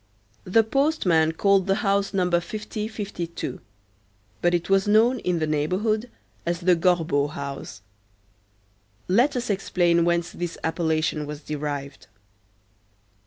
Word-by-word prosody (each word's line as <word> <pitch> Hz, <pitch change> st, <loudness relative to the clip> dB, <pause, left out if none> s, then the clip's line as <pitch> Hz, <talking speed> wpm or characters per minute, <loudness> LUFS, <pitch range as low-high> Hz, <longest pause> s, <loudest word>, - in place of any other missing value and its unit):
The 225 Hz, +5 st, +4 dB
postmen 215 Hz, -, +2 dB
called 195 Hz, +2 st, +3 dB
the 195 Hz, -, +3 dB
house 200 Hz, 0 st, +1 dB
Number 180 Hz, -3 st, +2 dB
50 210 Hz, +3 st, -5 dB
52; 200 Hz, -6 st, -5 dB, 0.8 s
but 175 Hz, 0 st, +3 dB
it 170 Hz, -, -2 dB
was 195 Hz, +1 st, +2 dB
known 230 Hz, +4 st, +4 dB
in 180 Hz, -4 st, -1 dB
the 160 Hz, -, 0 dB
neighborhood 190 Hz, +10 st, 0 dB, 0.3 s
as 170 Hz, +1 st, -2 dB
the 180 Hz, 0 st, +4 dB
Gorbeau 165 Hz, -5 st, +2 dB
house. 140 Hz, -8 st, -7 dB, 1.2 s
Let 245 Hz, +10 st, +3 dB
us 245 Hz, -3 st, -1 dB
explain 175 Hz, -3 st, +2 dB
whence 170 Hz, 0 st, 0 dB
this 175 Hz, -1 st, -5 dB
appellation 160 Hz, -2 st, 0 dB
was 150 Hz, 0 st, -7 dB
derived. 145 Hz, -2 st, -5 dB
175 Hz, 120 wpm, -24 LUFS, 160-205 Hz, 1.2 s, The